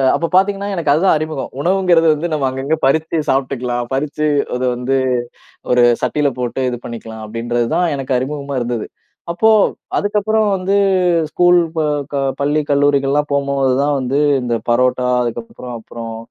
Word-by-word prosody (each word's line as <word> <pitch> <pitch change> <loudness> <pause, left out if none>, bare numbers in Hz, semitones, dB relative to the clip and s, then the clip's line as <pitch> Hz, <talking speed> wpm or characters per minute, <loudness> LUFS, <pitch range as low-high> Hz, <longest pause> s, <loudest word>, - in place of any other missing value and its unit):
அப்ப 170 - -1
பாத்தீங்கன்னா 200 +1 +2
எனக்கு 165 -5 0
அதுதான் 165 +4 +3
அறிமுகம். 155 -3 -4
"உணவுங்கிறது 180 -2 +3
வந்து 155 +3 -3
நம்ம 145 -3 0
அங்கங்க 135 +4 -1
பறிச்சு 160 +4 +1
சாப்ட்டுக்கலாம், 125 -2 -1
பறிச்சு 150 +2 -1 0.3
அது 125 +1 -1
வந்து 125 +2 -1 0.8
ஒரு 125 -1 +5 0.2
சட்டில 150 -1 +1
போட்டு 125 +1 -2
இது 120 - -4
பண்ணிக்கலாம்." 110 -2 -8
அப்டின்றது 120 +2 -2
தான் 175 -3 +1
எனக்கு 135 -1 -1
அறிமுகமா 140 +1 -4
இருந்தது. 120 -2 -3 0.5
அப்போ 220 +6 +3 0.5
அதுக்கப்புறம் 215 +1 +1
வந்து 190 +1 0 0.5
ஸ்கூல், 175 +1 +4 0.2
ப - - +1 0.3
க - - -2 0.2
பள்ளி, 145 +2 +1
கல்லூரிகள்லாம் 145 0 +2
போம்போது 140 -2 +1
தான் 145 0 +1
வந்து 130 +2 -1 0.2
இந்த 120 -1 -1
பரோட்டா, 125 +1 +2 0.2
அதுக்கப்பறம் 120 +1 -6
அப்பறம் 115 0 -8
140 Hz, 145 wpm, -17 LUFS, 125-160 Hz, 0.8 s, ஒரு